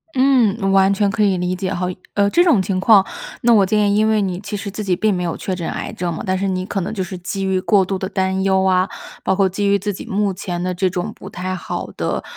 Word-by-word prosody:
嗯， 255 -5 +3
我 195 - +1
完 195 0 +4
全 200 0 +1
可 210 +2 0
以 195 -2 +2
理 180 +1 -1
解 185 0 -3
哈。 180 +1 -2 0.3
呃， 200 0 +3
这 345 +10 +4
种 285 - +4
情 185 -1 -1
况， 200 -2 +6 0.4
那 235 -1 +4
我 205 -3 +5
建 205 +1 +2
议 - - +2
因 215 +1 +3
为 215 -1 +2
你 185 -2 -2
其 205 0 -5
实 200 +1 -5
自 210 +2 -5
己 190 -3 0
并 215 +3 +1
没 180 -1 -2
有 170 - -2
确 185 - -3
诊 170 -2 -4
癌 - - -5
症 175 -1 -3
嘛， - - -5
但 185 0 0
是 195 +1 -1
你 185 0 -2
可 195 0 -2
能 190 - -4
就 195 - -3
是 185 0 -7
基 195 +2 -4
于 190 -1 0
过 195 -2 +3
度 195 0 -2
地 190 0 -4
担 190 -1 0
忧 190 -1 +2
啊， 185 0 +2 0.3
包 190 - +1
括 195 -1 +3
基 195 +2 -2
于 200 0 +3
自 205 +1 -2
己 - - -8
目 200 0 0
前 180 -1 -4
的 180 0 -1
这 185 +1 0
种 180 +4 -4
不 190 - -10
太 185 0 -4
好 - - -5
的 - - -2
195 Hz, 305 characters per minute, -19 LUFS, 185-205 Hz, 0.4 s, 况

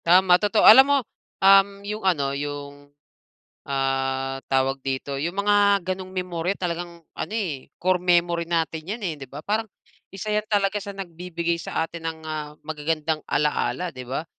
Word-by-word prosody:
Tama, 180 +1 +5
totoo. 210 +1 +3
Alam 265 +5 +10
mo, 285 - +5 0.5
um, 195 0 +8 0.2
yung 210 +1 -4
ano, 145 -8 +1
yung, 145 0 -6 0.8
ah, 135 -1 -1
tawag 135 0 +1
dito, 135 +1 -3
yung 170 +5 -3
mga 205 -2 +4
gano'ng 185 0 -7
memorya 180 0 -3
talagang 170 -1 -5
ano, - - -5
eh, 165 -12 -3
core 185 0 +1
memory 175 -1 +2
natin 165 -1 -1
'yan, 220 +4 -4
eh, 170 -4 -1
di 135 - -8
ba? 145 +4 -9
Parang 220 +2 -1 0.4
isa 205 +2 -5
yan 210 0 +1
talaga 205 -1 +1
sa 200 0 -8
nagbibigay 170 -2 -3
sa 160 - -2
atin 165 0 -6
ng, 160 0 -6
ah, 150 -1 -5
magagandang 155 0 -2
alaala 170 +4 0
di 130 -2 -9
ba? 135 +5 -3
170 Hz, 165 wpm, -24 LUFS, 145-190 Hz, 0.8 s, Alam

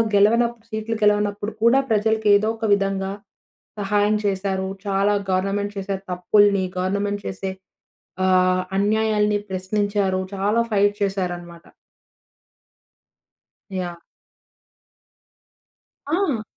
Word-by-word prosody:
గెలవనప్ 235 +4 +3
సీట్లు 220 0 -3
గెలవనప్పుడు 210 0 +1
కూడా 240 +4 +5
ప్రజలకి 220 0 +2
ఏదో 215 - -1
ఒక 225 - -3
విధంగా 195 -1 0 0.7
సహాయం 205 +1 +2
చేశారు. 190 -1 -1 0.2
చాలా 200 +1 +2 0.2
గవర్నమెంట్ 195 +2 -1
చేసే 195 0 -2 0.2
తప్పుల్ని, 200 +2 +3
గవర్నమెంట్ 200 +2 -1
చేసే 190 0 -4 0.7
ఆహ్, 185 0 +3
అన్యాయాల్ని 210 0 +2
ప్రశ్నించారు. 195 0 0
చాలా 205 +4 +1
ఫైట్ 205 0 +3
చేసారనమాట. 175 -3 -4 2.1
యాహ్! 175 -2 -4 2.1
ఆ! 300 - 0
205 Hz, 85 wpm, -22 LUFS, 190-210 Hz, 2.1 s, కూడా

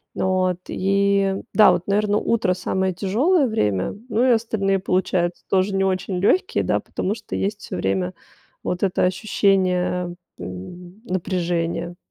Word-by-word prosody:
Вот 185 -1 +1
и, 195 0 +2 0.2
да, 215 -4 +7
вот, 180 0 -2
наверно, 205 +1 +2
утро 220 -4 +1
самое 190 +1 -1
тяжёлое 260 - +2
время, 105 - 0
ну, 235 0 +1
и 255 - +4
остальные 220 -4 +1
получаются 180 -2 0
тоже 195 +1 +2
не 195 - +2
очень 190 -1 -1
лёгкие, 360 - +2
да, - - +1
потому 195 - -3
что 215 -1 -7
есть 205 +2 -2
всё - - -7
время 95 0 -1 0.5
вот 180 +2 -2
это 190 -2 +1
ощущение, 180 -2 +1 0.3
м, 175 - -9
напряжения. 175 -2 -2
185 Hz, 140 wpm, -22 LUFS, 180-200 Hz, 0.5 s, да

